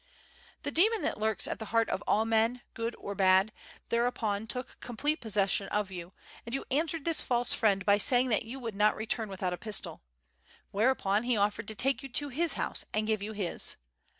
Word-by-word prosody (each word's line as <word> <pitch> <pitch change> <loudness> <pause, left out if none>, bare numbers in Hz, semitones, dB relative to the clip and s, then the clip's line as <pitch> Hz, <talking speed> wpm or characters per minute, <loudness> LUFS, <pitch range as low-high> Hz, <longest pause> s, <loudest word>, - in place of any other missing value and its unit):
"The 285 - -2
demon 425 +8 +3
that - - -1
lurks 220 -2 0
at - - -4
the 220 - -5
heart 230 +1 +2
of 195 - -2
all 220 +2 +3
men, 225 +2 +2
good 230 +1 -3
or 200 - -5
bad, 190 +1 +4 0.4
thereupon 225 -3 0
took 250 +2 -5
complete 285 +6 -1
possession 200 -3 +1
of 210 -2 -1
you, 175 -1 -7 0.3
and 235 +2 -4
you 270 - -4
answered 315 +2 0
this 330 -2 +5
false 245 -1 +1
friend 195 -4 +2
by 205 0 +5
saying 250 +4 +3
that 215 - +2
you 240 +4 -7
would 230 -4 -5
not 210 +2 +3
return 220 0 -2
without 185 -2 -2
a - - -4
pistol. 215 0 -3 0.7
Whereupon 210 -2 +2
he 240 -1 0
offered 210 +1 0
to 220 - -4
take 265 +5 0
you 275 - -8
to 290 +2 0
his 325 +6 +1
house - - -1
and 215 0 +1
give 215 -2 0
you 215 +2 -4
his. 200 -5 0
220 Hz, 205 wpm, -30 LUFS, 205-250 Hz, 0.7 s, this